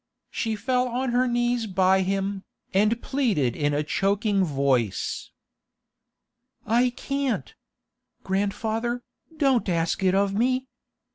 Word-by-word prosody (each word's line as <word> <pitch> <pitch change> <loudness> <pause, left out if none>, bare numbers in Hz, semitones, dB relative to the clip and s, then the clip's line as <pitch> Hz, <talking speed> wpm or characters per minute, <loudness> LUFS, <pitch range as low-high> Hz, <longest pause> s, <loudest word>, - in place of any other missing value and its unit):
She 225 -2 -1
fell 250 +3 0
on 250 +1 -1
her 250 +1 +2
knees 240 -1 0
by 190 0 +3
him, 195 +1 -1 0.3
and 210 +4 +3
pleaded 205 - +1
in 145 -1 0
a 150 - +1
choking 200 +4 +1
voice. 135 - 0 1.4
'I 240 +3 +3
can't! 275 -3 -2 0.7
Grandfather, 220 +5 -1 0.3
don't 265 -8 +2
ask 165 +1 0
it 190 0 +3
of 200 0 +2
me! 255 +4 +1
210 Hz, 115 wpm, -25 LUFS, 190-245 Hz, 1.4 s, by